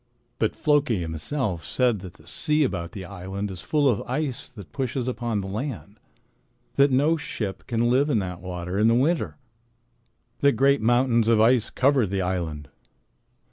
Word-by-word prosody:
"But 110 - 0
Floki 145 -6 +2
himself 85 - -2
said 115 +7 +1
that 90 -2 -9
the - - -19
sea 155 -1 +1
about 85 -10 -3
the 95 -2 -7
island 95 +2 -5
is 90 - -7
full 150 -2 +1
of 120 -6 +2
ice 135 -1 -2
that 100 -8 -12
pushes 130 -2 -2
upon 120 -4 -2
the 95 - -6
land, 110 -1 -5 0.7
that 140 +1 +4
no 145 +5 +3
ship 105 - -5
can 120 -1 +1
live 140 +4 +3
in 120 - +2
that 90 -3 -3
water 90 +1 -4
in 110 - +4
the 115 - +4
winter, 155 +8 +1 1.0
that 140 0 +4
great 135 +2 +3
mountains 120 0 +3
of 115 -1 +4
ice 115 +1 +4
cover 130 -4 +2
the 95 +1 -2
island. 80 -6 -3
115 Hz, 170 wpm, -25 LUFS, 95-135 Hz, 1.0 s, that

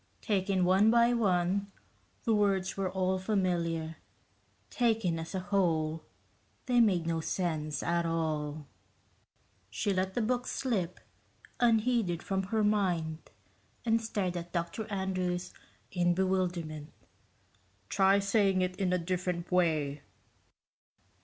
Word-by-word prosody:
Taken 190 -3 +1
one 190 +4 +5
by 235 +1 +5
one, 200 -2 +1 0.5
the 230 - +2
words 195 -2 +1
were 195 -1 -1
all 185 0 0
familiar 170 -5 -1 0.7
taken 220 -9 +1
as 165 +4 -6
a - - 0
whole, 165 -5 0 0.6
they 245 -2 +4
made 185 -7 +3
no 165 0 0
sense 155 -4 -2
at 170 0 +1
all. 155 -2 -2 1.0
She 200 - -1
let 190 0 -1
the 240 - +1
book 245 +2 0
slip 195 -9 -2 0.6
unheeded 225 -6 +2
from 190 -1 -1
her 215 +2 0
mind 175 -7 0 0.6
and 225 0 +3
stared 200 -5 -2
at 175 0 -7
Dr. 175 +6 -3
Andrews 185 -2 -2 0.4
in 175 -1 +2
bewilderment. 175 -5 -1 1.0
"Try 195 0 +4
saying 200 -1 +2
it 185 0 -2
in 190 -2 0
a 180 - +3
different 180 0 -3
way." 155 -5 +1
185 Hz, 120 wpm, -31 LUFS, 170-200 Hz, 1.0 s, one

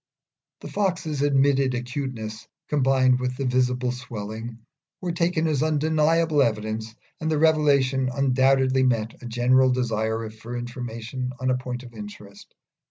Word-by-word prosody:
The - - -7
Fox's 170 -7 -1
admitted 140 -2 +3
acuteness, 120 -3 -5 0.2
combined 130 -3 +3
with 125 0 -2
the 135 - -2
visible 125 0 +1
swelling, 115 -2 -6 0.4
were 180 -2 -2
taken 170 -1 0
as 150 -4 +1
undeniable 155 0 +2
evidence, 110 -1 -1 0.2
and 160 - -2
the 155 - +1
revelation 140 -4 +3
undoubtedly 130 0 +3
met 115 -4 0
a 120 - -7
general 125 +2 +3
desire 110 -3 -1
for 115 +3 -7
information 120 +1 -5
on 130 0 +1
a 125 - +1
point 125 0 -5
of 120 -1 -12
interest. 105 -2 -11
130 Hz, 135 wpm, -24 LUFS, 120-140 Hz, 0.4 s, admitted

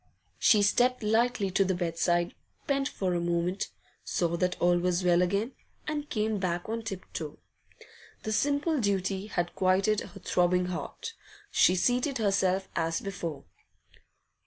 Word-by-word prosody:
She 210 -3 +5
stepped 245 +4 +3
lightly 220 -2 +2
to 195 - +3
the 190 -1 0
bedside, 175 0 0 0.3
bent 275 -1 +1
for 185 -6 -2
a 175 - +1
moment, 175 +2 0 0.4
saw 170 -1 0
that 180 +1 0
all 175 0 +4
was 180 +1 0
well 175 0 +4
again, 200 +7 0 0.4
and 300 -1 -3
came 215 -1 0
back 175 -2 -2
on 225 +1 -2
tip 195 -5 -6
toe. 155 -3 -5 0.9
The 215 - -3
simple 290 +6 +1
duty 195 -2 0
had 175 -4 -2
quieted 190 +3 +2
her 195 - -10
throbbing 180 0 +2
heart. 180 - -5 0.4
She 180 - +5
seated 250 +8 +1
herself 195 -3 +1
as 165 0 0
before. 170 -7 -5
190 Hz, 145 wpm, -29 LUFS, 175-220 Hz, 0.9 s, She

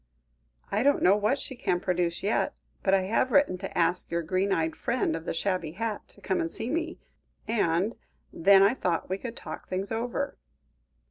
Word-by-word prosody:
"I 205 - +1
don't 285 +3 +3
know 190 +3 +6
what 210 +6 +1
she 265 - -5
can 205 -7 0
produce 175 -2 -1
yet, 205 +3 0 0.2
but 195 0 +3
I 190 - +3
have 225 +6 +1
written 280 -8 +4
to 195 - -6
ask 175 +1 +1
your 170 0 -1
green 185 +4 0
eyed 160 -3 +1
friend 235 -9 0
of 165 0 -6
the - - -2
shabby 170 -3 -1
hat, 220 +2 -3
to 200 - -17
come 190 0 0
and 165 - -1
see 225 +7 -4
me, 330 +1 -2 0.5
and 200 -1 +1 0.4
then 195 +3 +6
I 200 +4 +5
thought 180 -10 -1
we 190 - -1
could 235 +1 -6
talk - - -7
things 190 +3 -3
over." 245 +5 -2
195 Hz, 195 wpm, -28 LUFS, 175-230 Hz, 0.5 s, know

